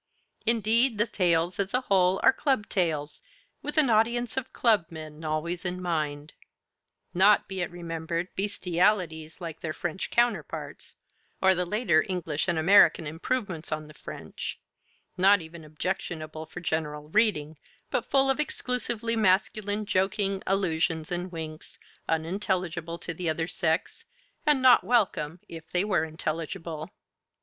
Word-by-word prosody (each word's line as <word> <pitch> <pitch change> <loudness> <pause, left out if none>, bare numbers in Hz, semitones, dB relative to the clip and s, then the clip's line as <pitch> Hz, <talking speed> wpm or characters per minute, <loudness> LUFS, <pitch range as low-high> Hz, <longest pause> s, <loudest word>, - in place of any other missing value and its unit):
Indeed, 230 +2 +3
the 210 - +3
tales 175 -4 +1
as 200 +4 0
a 250 - +2
whole 190 -5 +3
are - - +7
club 260 -7 0
tales, 160 -6 -1 0.4
with 295 - -5
an 285 -6 +5
audience 235 +2 +2
of 265 -1 -3
club 215 -8 +3
men 155 -1 -9
always 160 +3 -2
in 180 0 -3
mind; 155 -4 -2 0.8
not, 200 +3 +5
be 190 -1 -4
it 175 - -1
remembered, 170 0 -4
bestialities 180 -4 0
like 165 -3 -6
their 155 -2 -3
French 175 +2 -3
counterparts, 240 0 -1 0.4
or 190 0 +5
the 180 -1 -1
later 175 -6 +2
English 165 -4 -2
and 175 -2 +1
American 165 -1 +6
improvements 165 +1 -3
on 155 0 -2
the 150 - -13
French, - - -7 0.6
not 195 +2 +6
even 165 0 -10
objectionable 155 -1 -4
for 175 - -8
general 150 -2 -3
reading, 160 -7 +2 0.3
but - - -1
full 270 -1 +4
of 270 +1 +1
exclusively 240 -5 -1
masculine 205 0 +1
joking, 195 0 0
allusions, 165 -4 0
and 175 +1 -3
winks, 160 -2 -7 0.3
unintelligible 170 0 -1
to 175 - -6
the 170 0 -2
other 165 +1 -1
sex, 160 -2 -1 0.4
and 290 -3 +4
not 255 -1 +7
welcome 185 -7 +1
if 165 -1 -10
they 180 +1 +1
were 200 -5 +1
intelligible. 160 +1 -4
180 Hz, 140 wpm, -27 LUFS, 160-205 Hz, 0.8 s, are